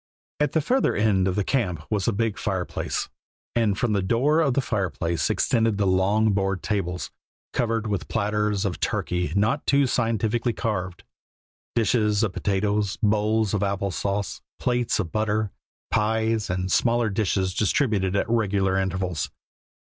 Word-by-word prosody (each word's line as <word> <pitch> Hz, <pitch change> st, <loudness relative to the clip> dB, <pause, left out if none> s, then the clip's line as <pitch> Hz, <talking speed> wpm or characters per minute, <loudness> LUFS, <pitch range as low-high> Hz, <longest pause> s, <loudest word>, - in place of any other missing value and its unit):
At 150 Hz, -2 st, +1 dB
the 160 Hz, -, +3 dB
further 255 Hz, -, +1 dB
end 100 Hz, -3 st, +2 dB
of 95 Hz, -, 0 dB
the 105 Hz, -, +1 dB
camp 95 Hz, -, -1 dB
was 100 Hz, -3 st, 0 dB
a -, -, +4 dB
big 110 Hz, +1 st, -1 dB
fireplace, -, -, -2 dB, 0.5 s
and 110 Hz, -4 st, +2 dB
from 115 Hz, -1 st, +1 dB
the 100 Hz, -, +2 dB
door 130 Hz, -, +2 dB
of 140 Hz, -6 st, +2 dB
the -, -, +3 dB
fireplace 90 Hz, -, -1 dB
extended 115 Hz, -3 st, +1 dB
the 100 Hz, -, +1 dB
long 100 Hz, +4 st, +3 dB
board 95 Hz, -1 st, -1 dB
tables, 90 Hz, -4 st, -2 dB, 0.4 s
covered 115 Hz, -2 st, 0 dB
with 100 Hz, -5 st, -2 dB
platters 105 Hz, -1 st, 0 dB
of 95 Hz, -3 st, -2 dB
turkey 90 Hz, -1 st, -1 dB
not 110 Hz, +8 st, +1 dB
too 140 Hz, 0 st, +4 dB
scientifically 115 Hz, -1 st, 0 dB
carved, 95 Hz, -7 st, -3 dB, 0.7 s
dishes 105 Hz, -2 st, +2 dB
of 105 Hz, -4 st, 0 dB
potatoes, 100 Hz, 0 st, 0 dB
bowls 110 Hz, 0 st, +2 dB
of 105 Hz, -, +1 dB
apple 100 Hz, -1 st, -1 dB
sauce, 100 Hz, +2 st, -2 dB, 0.2 s
plates 125 Hz, -1 st, 0 dB
of 90 Hz, -6 st, -2 dB
butter, 110 Hz, -1 st, 0 dB, 0.4 s
pies, 110 Hz, 0 st, +1 dB
and 90 Hz, +1 st, -2 dB
smaller 115 Hz, 0 st, +2 dB
dishes 95 Hz, -2 st, 0 dB
distributed 105 Hz, -4 st, +1 dB
at 100 Hz, -, +1 dB
regular 100 Hz, -4 st, +1 dB
intervals. 95 Hz, -3 st, -2 dB
105 Hz, 150 wpm, -25 LUFS, 95-115 Hz, 0.7 s, a